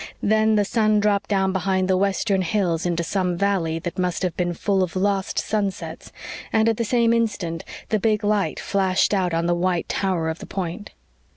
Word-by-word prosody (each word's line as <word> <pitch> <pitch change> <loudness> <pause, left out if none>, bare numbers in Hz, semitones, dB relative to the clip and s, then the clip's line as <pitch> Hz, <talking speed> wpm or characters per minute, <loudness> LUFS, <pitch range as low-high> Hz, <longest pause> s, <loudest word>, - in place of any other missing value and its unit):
Then 220 +1 +3
the 205 -1 +3
sun 215 0 +2
dropped 205 -1 +1
down 190 -2 +1
behind 190 0 0
the 190 - +3
western 195 +1 +1
hills 180 -3 0
into 170 -1 -1
some 180 0 -1
valley 180 -5 0
that 175 +2 -5
must 180 0 -1
have 180 -3 -1
been 175 -1 -1
full 195 +1 +1
of 185 -1 -2
lost 195 0 0
sunsets, 205 -3 -3 0.4
and 220 0 +3
at 225 -2 +2
the 235 - 0
same 230 +1 +2
instant 200 -8 -1 0.3
the 215 - +1
big 215 0 +1
light 205 -1 0
flashed 190 0 +1
out 185 -3 +1
on 165 0 0
the 175 - +2
white 175 0 0
tower 185 -4 -1
of 160 +1 -3
the - - -9
point. 190 +2 -5
190 Hz, 195 wpm, -23 LUFS, 175-210 Hz, 0.4 s, Then